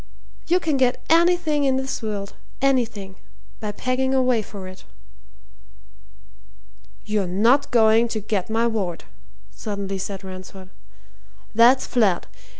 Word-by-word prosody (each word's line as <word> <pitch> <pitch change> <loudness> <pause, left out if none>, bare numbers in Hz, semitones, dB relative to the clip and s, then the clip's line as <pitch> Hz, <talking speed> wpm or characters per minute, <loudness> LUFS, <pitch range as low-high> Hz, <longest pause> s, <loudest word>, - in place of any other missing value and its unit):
You 355 +2 +3
can 315 -5 0
get 255 -2 +1
anything 330 -3 +3
in 265 -1 +2
this 265 0 -3
world 205 -2 -4 0.3
anything! 225 -8 0 0.4
by 210 -1 -4
pegging 260 +4 -1
away 255 -3 +2
for 195 -2 -9
it." 185 0 -12 2.2
"You're 210 -3 -1
not 230 +10 +3
going 225 -1 +4
to 225 -1 -3
get 205 -2 -2
my 225 +1 +1
ward," 200 -7 -2 0.5
suddenly 200 -2 -5
said 195 +1 -5
Ransford. 185 0 -10 0.8
"That's 240 +4 +5
flat! 210 -8 +1
225 Hz, 120 wpm, -22 LUFS, 195-260 Hz, 2.2 s, That's